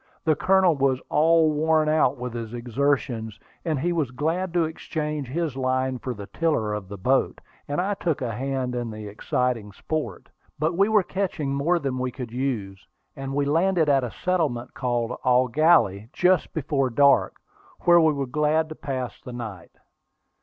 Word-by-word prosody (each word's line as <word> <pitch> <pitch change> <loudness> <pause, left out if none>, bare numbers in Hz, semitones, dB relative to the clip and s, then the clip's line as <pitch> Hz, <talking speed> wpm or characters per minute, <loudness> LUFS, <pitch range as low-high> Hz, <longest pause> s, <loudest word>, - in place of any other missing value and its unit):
The 160 - +3
Colonel 185 0 +3
was 135 -2 +1
all 160 +1 +4
worn 155 +1 +2
out 155 -3 +2
with 125 -1 -5
his 115 -1 -5
exertions, 120 -3 -1 0.2
and 155 -4 -1
he 175 +5 0
was 155 -7 0
glad 165 +8 -1
to 170 - +4
exchange 150 -3 -4
his 155 +1 -2
line 130 -1 0
for 125 0 -4
the 100 -1 -8
tiller 130 -7 0
of 105 -3 -5
the 100 - -7
boat, 130 +8 +1 0.3
and 145 +3 -2
I 195 +3 0
took 170 -6 -1
a 125 -3 -2
hand 130 +1 -2
in 120 -1 -3
the 110 -1 -7
exciting 110 +1 -2
sport. 155 +9 -4 0.3
But 155 +3 0
we 200 +4 +3
were 215 -3 +4
catching 175 -8 -2
more 150 +6 +2
than 135 -5 -2
we 130 0 -1
could 125 -2 -7
use, 115 -7 -3 0.3
and 135 -1 -5
we 145 0 +1
landed 165 +2 +2
at 135 -2 +3
a 125 - -2
settlement 150 -8 -1
called 120 -1 -1
Eau 125 0 +4
Gallie 120 - +3
just 180 -2 +2
before 140 -3 0
dark, 140 +3 +4 0.5
where 175 -1 +6
we 160 -1 +4
were 140 -1 -2
glad 150 +4 +1
to 155 - -7
pass 130 -4 -5
the 125 - -9
night. 105 -8 -8
140 Hz, 180 wpm, -25 LUFS, 125-160 Hz, 0.5 s, where